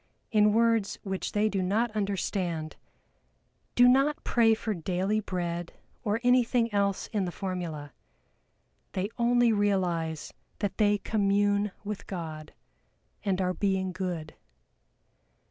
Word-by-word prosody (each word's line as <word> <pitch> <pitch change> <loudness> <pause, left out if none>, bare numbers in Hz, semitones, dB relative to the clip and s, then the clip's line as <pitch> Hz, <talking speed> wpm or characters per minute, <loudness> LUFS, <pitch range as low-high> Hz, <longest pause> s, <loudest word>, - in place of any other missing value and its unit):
in 210 -1 +5
words 230 -2 +2
which 190 -2 -3
they 210 +1 +2
do 200 -3 -1
not 215 +6 +1
understand, 185 -5 -2 1.0
do 245 0 +7
not 275 +4 +3
pray 225 -2 +4
for 220 0 -3
daily 185 +4 -1
bread 175 -4 -3 0.3
or 215 -1 0
anything 245 -2 +3
else 200 -1 +1
in 205 -3 +1
the 175 - -3
formula; 170 -6 -5 1.0
they 190 +2 -1
only 240 -1 +4
realize 175 -6 0 0.2
that 200 -3 -3
they 205 -1 +4
commune 205 0 +1
with 210 -1 -5
God, 160 -4 -6 0.7
and 195 -2 0
are 185 0 +1
being 190 -1 0
good. 180 -4 -4
200 Hz, 120 wpm, -28 LUFS, 180-215 Hz, 1.0 s, do